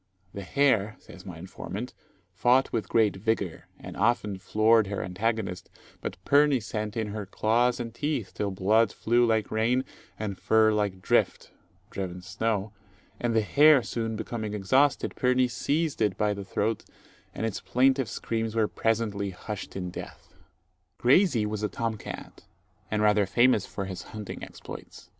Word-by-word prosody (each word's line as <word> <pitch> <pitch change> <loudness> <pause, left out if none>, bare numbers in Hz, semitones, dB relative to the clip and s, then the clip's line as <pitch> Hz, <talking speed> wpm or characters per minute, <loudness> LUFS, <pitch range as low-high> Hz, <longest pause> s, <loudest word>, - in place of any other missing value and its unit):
"The 100 - -6
hare," 110 -1 +2
says 95 +1 -14
my 90 -3 -7
informant, 95 +6 -7 0.4
"fought 125 +7 +3
with 115 - -2
great 110 -3 +3
vigour, 100 -4 -2
and - - -9
often 105 -2 +1
floored 110 +2 +3
her 100 0 -3
antagonist; 95 0 -2 0.3
but - - -5
Pirnie 145 -1 +4
sent 110 -1 -4
in 110 -2 -1
her 105 -1 -5
claws 120 +5 +1
and 115 -2 -5
teeth, 145 -5 -2
till 105 - -2
blood 100 +3 +2
flew 120 +2 +2
like 110 -1 +1
rain, 120 +4 +1 0.3
and 105 -3 -4
fur 110 -1 +4
like 100 -3 -1
drift - - +1 0.4
(driven 90 -2 -5
snow); 105 +2 -2 0.5
and 120 -1 0
the 110 - +4
hare 145 +3 +6
soon 115 -1 -3
becoming 110 -1 -4
exhausted, 130 +8 +2
Pirnie 125 0 +2
seized 145 +5 -1
it 105 -3 +1
by 105 -1 +1
the 100 0 -6
throat, 105 +3 -1 0.5
and - - -2
its 110 -4 -3
plaintive 130 +5 +2
screams 115 -1 -3
were 110 -2 +3
presently 105 -3 -1
hushed 95 +2 -7
in 90 -2 -4
death." - - -10 0.6
Graysie 130 - +4
was 105 0 -3
a 105 - 0
tom 115 +1 -2
cat, - - -9 0.5
and 105 0 0
rather 105 -1 +4
famous 120 -1 +3
for 100 - -5
his 95 -1 -6
hunting 105 +2 -8
exploits. - - -10
110 Hz, 155 wpm, -27 LUFS, 100-120 Hz, 0.6 s, hare